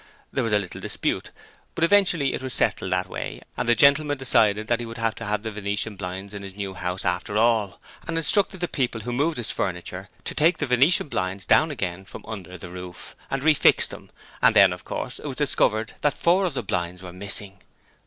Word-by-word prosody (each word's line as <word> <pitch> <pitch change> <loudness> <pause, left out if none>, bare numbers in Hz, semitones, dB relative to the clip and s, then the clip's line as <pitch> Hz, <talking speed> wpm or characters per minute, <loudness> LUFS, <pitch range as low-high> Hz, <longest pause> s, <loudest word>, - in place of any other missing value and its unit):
There - - 0
was 115 - -1
a 105 - +5
little 95 -4 -5
dispute, - - -2 0.5
but - - -1
eventually 175 -6 +4
it - - -3
was 130 -1 +1
settled 95 - +1
that 90 0 0
way - - -6 0.2
and - - -2
the 120 - +5
gentleman 145 +3 +4
decided 110 -5 +2
that 120 0 +1
he 120 - -4
would 115 +1 -8
have 115 -1 0
the 105 +2 -3
venetian 105 +1 -2
blinds 95 +1 -6
in 100 - -6
his 95 -1 -9
new 100 -2 -4
house 90 0 -4
after 90 +3 -1
all, 110 -3 +2 0.3
and 165 -1 -2
instructed 190 +3 +2
the 175 - 0
people 125 -7 -2
who 120 +3 -4
moved 150 +5 0
his 120 - -3
furniture 90 +1 -4 0.2
to - - -2
take 165 +4 +3
the 145 - -1
venetians 125 - +1
down 160 - +4
again 95 - -4
from - - -11
under 95 -5 -8
the 90 0 -9
roof, 90 0 -9
and 135 -1 -2
refix 155 -1 +5
them, - - -11 0.3
and - - +5
then, - - +7
of - - -10
course, - - -5
it - - -7
was - - -5
discovered 110 +1 +2
that 145 - +2
four 180 +3 +3
of 170 -6 -2
the 125 - -2
blinds 90 -2 -3
were 90 -1 -8
missing. 100 0 -2
110 Hz, 215 wpm, -24 LUFS, 95-135 Hz, 0.5 s, then